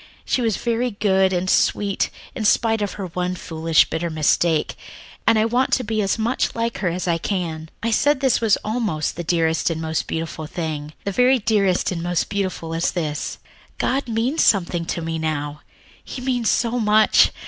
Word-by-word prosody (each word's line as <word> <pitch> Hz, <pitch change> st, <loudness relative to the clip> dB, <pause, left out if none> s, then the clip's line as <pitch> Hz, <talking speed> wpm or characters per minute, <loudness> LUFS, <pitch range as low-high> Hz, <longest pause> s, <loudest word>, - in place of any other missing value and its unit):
She 255 Hz, -, 0 dB
was 225 Hz, -4 st, +1 dB
very 240 Hz, +1 st, 0 dB
good 190 Hz, -3 st, +2 dB
and 180 Hz, 0 st, -1 dB
sweet, 200 Hz, +1 st, +1 dB, 0.2 s
in 230 Hz, -, -4 dB
spite 225 Hz, +1 st, +2 dB
of 205 Hz, -, -2 dB
her 195 Hz, -, -5 dB
one 180 Hz, +1 st, -3 dB
foolish, 165 Hz, -2 st, +2 dB
bitter 170 Hz, +1 st, -2 dB
mistake, 155 Hz, +1 st, +1 dB, 0.5 s
and 225 Hz, -1 st, +5 dB
I 215 Hz, -, +3 dB
want 245 Hz, +3 st, +1 dB
to 255 Hz, -, +2 dB
be 220 Hz, -1 st, -1 dB
as 195 Hz, +1 st, 0 dB
much 230 Hz, +3 st, 0 dB
like 230 Hz, 0 st, -2 dB
her 185 Hz, -, -1 dB
as 180 Hz, +2 st, -3 dB
I 170 Hz, -1 st, +1 dB
can. 165 Hz, -4 st, -3 dB
"I 230 Hz, -, 0 dB
said 290 Hz, +6 st, +3 dB
that -, -, -15 dB
this 265 Hz, -3 st, +2 dB
was 220 Hz, -3 st, +3 dB
almost 215 Hz, -9 st, -1 dB
the 175 Hz, -, -4 dB
dearest 165 Hz, -1 st, +1 dB
and 165 Hz, -1 st, -3 dB
most 160 Hz, 0 st, -2 dB
beautiful 160 Hz, -1 st, -4 dB
thing. 155 Hz, -2 st, -4 dB
The 200 Hz, -, -1 dB
very 250 Hz, +5 st, +4 dB
dearest 200 Hz, -6 st, +1 dB
and 170 Hz, -2 st, -3 dB
most 175 Hz, 0 st, -1 dB
beautiful 185 Hz, -5 st, -2 dB
is 165 Hz, +1 st, 0 dB
this 155 Hz, -4 st, -3 dB, 0.4 s
God 270 Hz, 0 st, 0 dB
means 235 Hz, +8 st, 0 dB
something 175 Hz, -4 st, +2 dB
to 170 Hz, 0 st, -3 dB
me 165 Hz, 0 st, -3 dB
now. 150 Hz, -2 st, -3 dB, 0.4 s
He -, -, -7 dB
means 250 Hz, -3 st, 0 dB
so 240 Hz, +1 st, +1 dB
much! 215 Hz, -1 st, +5 dB
190 Hz, 190 wpm, -22 LUFS, 165-225 Hz, 0.5 s, and